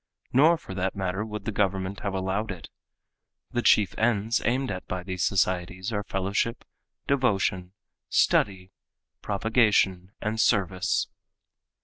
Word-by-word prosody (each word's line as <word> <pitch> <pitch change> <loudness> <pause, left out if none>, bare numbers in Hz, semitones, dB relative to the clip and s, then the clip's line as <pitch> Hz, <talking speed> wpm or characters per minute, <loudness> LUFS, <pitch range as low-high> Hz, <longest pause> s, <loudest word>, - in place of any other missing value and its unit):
Nor 155 +6 +6
for 95 - -9
that 95 0 -2
matter 95 +1 -2
would 105 -1 -6
the 110 - -1
government 95 -1 -1
have 100 -1 -3
allowed 95 +3 -1
it. 90 -6 -7 0.8
The 120 -1 0
chief 105 -4 +4
ends 110 -1 +1
aimed 130 +1 0
at 95 -1 -6
by 90 -1 -4
these 95 -2 -3
societies 95 +1 0
are 105 - 0
fellowship, 100 +4 -2 0.4
devotion, 95 -9 0 0.4
study, 95 -1 +2 0.5
propagation, 100 -3 +2
and 110 +1 -1
service. 95 -4 +1
100 Hz, 125 wpm, -26 LUFS, 95-110 Hz, 0.8 s, Nor